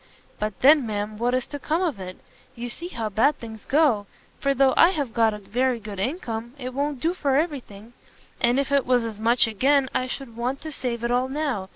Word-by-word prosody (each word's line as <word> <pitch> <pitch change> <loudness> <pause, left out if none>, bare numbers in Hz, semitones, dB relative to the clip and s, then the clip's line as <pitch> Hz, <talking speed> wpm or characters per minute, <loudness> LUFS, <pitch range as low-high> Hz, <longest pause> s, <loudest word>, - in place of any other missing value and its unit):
But 210 -2 -3
then, 280 -2 +6
ma'am, 210 0 -3
what 245 +2 +1
is 255 - -1
to 290 - -7
come 320 +6 0
of 305 - -1
it? 185 0 -7 0.4
You 240 0 -5
see 340 +8 -5
how 230 -10 -4
bad 225 +9 +2
things 220 -2 -10
go! 265 -9 +2 0.3
for 275 0 +1
though 270 -1 +4
I 335 - +7
have 290 -10 -3
got 225 -1 +3
a 210 - -5
very 245 +4 -1
good 210 -3 -8
income, 235 - -3
it 255 -1 -6
won't 285 0 -2
do 330 +6 0
for 280 -7 0
every 300 -1 +1
thing. 215 0 -14 0.5
And 240 +3 +3
if 280 0 -1
it 280 -2 +2
was 250 -2 +3
as 220 -2 -6
much 235 +2 +4
again, 260 +5 +2
I 255 - 0
should 255 -3 -6
want 250 +4 -2
to 315 - -6
save 240 -4 -3
it 235 - 0
all 250 +1 +2
now. 270 -10 -2
250 Hz, 230 wpm, -24 LUFS, 225-280 Hz, 0.5 s, I